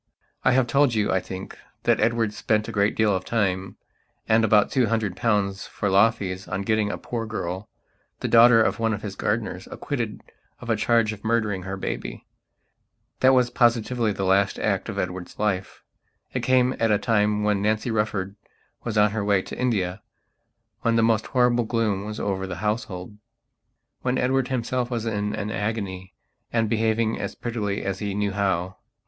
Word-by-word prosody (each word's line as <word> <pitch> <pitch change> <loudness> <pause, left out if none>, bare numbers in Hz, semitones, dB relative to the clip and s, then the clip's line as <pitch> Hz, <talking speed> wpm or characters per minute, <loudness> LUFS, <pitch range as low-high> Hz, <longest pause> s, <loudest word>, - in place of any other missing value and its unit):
I - - +4
have 130 -1 +4
told 135 -1 +3
you, 105 -1 +1
I 95 - +2
think, 95 +1 -8 0.3
that - - +3
Edward 115 -1 +1
spent 105 0 0
a - - -4
great 100 -1 +1
deal 105 -3 +3
of 95 - -2
time, 95 -4 -1 0.5
and 110 +1 +4
about 105 -2 +4
two 125 -3 +2
hundred 110 -4 -1
pounds 105 -4 0
for 100 - -2
law 100 +4 +6
fees 95 -4 -6
on 95 +1 -3
getting 110 0 +1
a - - -4
poor 115 -2 -4
girl, 95 -1 -4 0.5
the - - -2
daughter 115 0 +7
of - - 0
one 115 -1 +1
of 105 - -10
his 100 -2 -5
gardeners, 105 -3 -2
acquitted 120 -7 -4 0.4
of 120 -2 -4
a - - +3
charge 110 0 +2
of 105 - -12
murdering 110 -4 0
her 95 +1 -5
baby. - - -5 0.9
That 130 0 +5
was 125 -1 +3
positively 120 -1 +2
the 95 -1 -2
last 95 +1 +2
act 100 0 -1
of 105 - -5
Edward's 90 -2 -4
life. 100 -3 -2 0.5
It - - -1
came 130 0 +3
at 115 - +2
a 105 - +4
time 105 -1 +1
when 105 -1 +1
Nancy 110 +3 0
Rufford 105 -3 -1 0.5
was 115 -2 -3
on 105 0 +5
her 110 -1 -2
way 100 -2 +2
to - - -8
India; 105 -6 0 0.8
when 115 0 +1
the 115 - +3
most 110 -1 +2
horrible 125 -2 +2
gloom 110 -4 0
was 105 0 -5
over 95 -1 -2
the 90 - -5
household; 105 -2 -3 0.8
when 130 0 0
Edward 130 0 +1
himself 125 -1 -1
was 115 -3 -2
in 105 -2 -1
an 105 0 -3
agony 100 -3 -4 0.4
and 115 -1 +1
behaving 110 0 +1
as - - -4
prettily 105 -4 -3
as 100 -1 -3
he 100 -2 -3
knew 105 -1 0
how. 95 -2 -1
105 Hz, 185 wpm, -24 LUFS, 100-115 Hz, 0.9 s, daughter